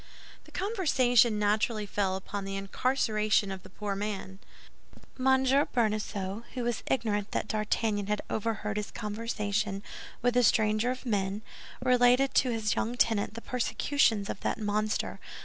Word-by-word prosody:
The - - -17
conversation 255 - +3
naturally 210 +1 +1
fell 195 -2 0
upon 200 +1 -5
the 195 0 -4
incarceration 215 0 +1
of 190 -1 -6
the 185 - -14
poor 200 +1 -4
man. 195 -2 -4 0.8
M. 265 0 +4 0.3
Bonacieux, 210 -2 -1
who 250 - -2
was 240 -2 -1
ignorant 210 -5 0
that - - -1
D'Artagnan 215 -1 0
had 210 0 -1
overheard 210 -1 -2
his 210 - -3
conversation 210 -2 -2 0.4
with 245 0 +3
the 245 - +4
stranger 215 0 +3
of 255 +1 -4
Meung, 205 -2 -1 0.4
related 250 +1 +4
to 260 - +3
his 220 -3 0
young 235 +2 -2
tenant 220 -2 +1
the 230 - -6
persecutions 245 -3 +1
of - - -4
that - - -1
monster, 215 0 -1
M. - - -17
215 Hz, 150 wpm, -29 LUFS, 205-240 Hz, 0.8 s, M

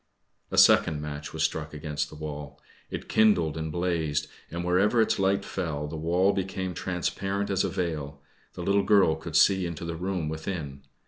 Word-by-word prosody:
A - - -4
second 75 -2 +6
match 75 0 -6
was 80 -1 -2
struck 80 -1 -2
against 75 -1 -3
the - - -11
wall. 75 -1 -7 0.3
It - - -6
kindled 95 -8 +3
and 80 -1 -3
blazed, 80 -4 0 0.2
and 85 +1 -4
wherever 95 +6 +3
its 110 -1 +2
light 100 +1 +2
fell 80 -6 -3
the 80 - -6
wall 90 +5 +2
became 95 -1 -3
transparent 95 +3 -2
as 95 - +2
a - - 0
veil 80 -6 -3 0.4
the 90 - -5
little 100 +2 +3
girl 100 -6 +4
could 80 0 -7
see 95 +2 +5
into 85 -1 -6
the 85 0 -4
room 90 -1 -2
within. 80 -3 -5
85 Hz, 180 wpm, -27 LUFS, 75-95 Hz, 0.4 s, second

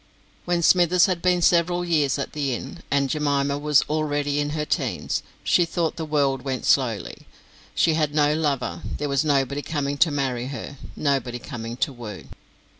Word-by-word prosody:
When 175 -1 0
Smithers 175 0 +5
had 180 -3 -1
been 180 -1 +2
several 175 +1 +3
years 150 -6 +1
at 140 - -4
the 140 -4 -1
inn, 135 +7 -8
and 140 -1 +2
Jemima 140 -1 0
was 150 -1 +3
already 145 -1 -1
in 145 0 0
her 150 - -1
teens, - - -1 0.2
she 175 - +4
thought 165 -1 -1
the 160 - -4
world 140 -3 +1
went 130 -1 -3
slowly; 120 -6 0 0.5
she 165 - +3
had 150 -2 0
no 150 -1 +3
lover, 145 -5 -1 0.2
there 145 - -2
was 140 +1 +1
nobody 140 -1 +1
coming 145 -2 -3
to 165 - +5
marry 130 -4 -2
her, 135 +1 -7 0.2
nobody 135 -4 -1
coming 120 -2 -7
to 140 +1 -1
woo. 115 -5 -8
145 Hz, 175 wpm, -24 LUFS, 135-155 Hz, 0.5 s, Smithers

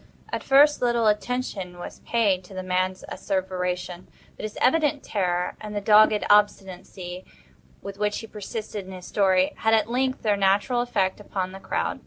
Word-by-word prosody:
At - - -1
first 290 +2 +5
little 240 -2 +2
attention 210 -4 -1
was 175 - -9
paid 205 -6 +1
to 190 - -13
the 185 - -4
man's 185 0 -1
asseveration; 180 -2 -3 0.3
but - - -10
his 215 - -7
evident 295 +1 +2
terror, 180 -3 -1
and 210 -1 -7
the - - 0
dogged 210 +1 +5
obstinacy 190 -3 0 0.6
with 200 0 -8
which 210 0 0
he - - -6
persisted 210 -2 -6
in 190 - -9
his 180 -1 -10
story, 190 -2 +2
had 220 0 +3
at 220 +1 0
length 260 +2 -1
their 210 -2 +2
natural 200 +5 +2
effect 205 -6 -1
upon 190 -2 -4
the 190 - -9
crowd. - - -2
200 Hz, 170 wpm, -25 LUFS, 185-225 Hz, 0.6 s, first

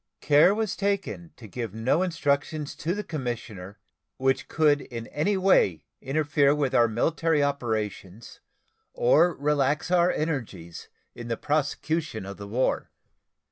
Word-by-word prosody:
Care 150 +7 +5
was 220 -1 -2
taken 200 -4 -2
to 115 - -12
give 115 -1 -6
no 125 +9 +1
instructions 150 -3 -1
to 170 +4 -3
the 210 - -4
commissioner 115 - -6 0.4
which 135 0 0
could 150 -2 +2
in 115 -4 -7
any 195 +7 0
way 185 - +3 0.2
interfere 145 0 +2
with 145 -3 -1
our 120 - +5
military 155 +6 +1
operations 110 -6 -4 0.5
or 485 - +3
relax 145 +2 0
our 180 0 +4
energies 115 - -4 0.2
in 120 - -9
the 115 -1 -2
prosecution 150 - -2
of 100 0 -8
the 100 - -8
war. 125 +5 -1
145 Hz, 135 wpm, -26 LUFS, 115-165 Hz, 0.5 s, Care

